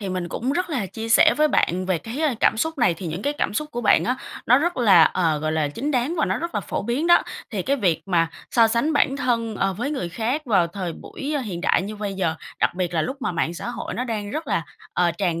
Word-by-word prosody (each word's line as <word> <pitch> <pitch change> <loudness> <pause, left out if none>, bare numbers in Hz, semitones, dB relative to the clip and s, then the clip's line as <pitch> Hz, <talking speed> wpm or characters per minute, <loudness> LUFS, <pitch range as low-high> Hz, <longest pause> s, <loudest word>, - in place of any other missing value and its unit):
thì 200 - -4
mình 180 -2 -3
cũng 255 +10 -2
rất 360 +2 -1
là 245 -10 -1
chia 225 +4 -6
sẻ 230 - +6
với 305 0 +4
bạn 185 -6 +1
về 185 -3 +1
cái, 235 - -6
ơ, 300 -6 +2
cảm - - +4
xúc 320 +5 -2
này 180 - +3
thì 175 +1 -7
những 165 +5 -4
cái 285 - 0
cảm 250 - -2
xúc 300 +3 -2
của 240 - -4
bạn 220 - +4
á, 250 +1 0 0.3
nó 250 +3 +6
rất 345 +4 -1
là, 225 -6 +6
ờ, 165 -4 +1
gọi 155 +1 -2
là, 155 -2 0
chính 265 - -3
đáng, 265 +5 0
và - - +3
nó - - -1
rất 340 +1 -5
là - - 0
phổ - - -4
biến 245 +9 -1
đó. 345 - +6 0.3
Thì 200 -6 -2
cái 280 +2 +1
việc 185 - +1
mà 165 -3 +2 0.2
so 230 -2 +5
sánh 235 +8 +1
bản 275 -1 +2
thân, 230 -5 -1
ờ, 195 0 +1
với 245 +9 -3
người 185 -13 -3
khác 240 - -2
vào 195 -9 +3
thời 175 -1 -5
buổi, 305 - -6
ơ, 285 - 0
hiện 190 -8 -5
đại 180 - +2
như 210 +2 -6
bây 205 -2 -4
giờ, 170 -4 0 0.3
đặc - - +2
biệt 180 -1 -2
là 160 - +2
lúc 265 - -3
mà - - -1
mạng 170 0 -1
xã 205 - -6
hội - - -5
nó 250 - -2
đang 210 -4 -4
rất 310 +2 -4
là, 165 - 0 0.3
ờ, 175 -1 +2
tràn 170 -4 0
220 Hz, 285 wpm, -23 LUFS, 180-275 Hz, 0.3 s, sẻ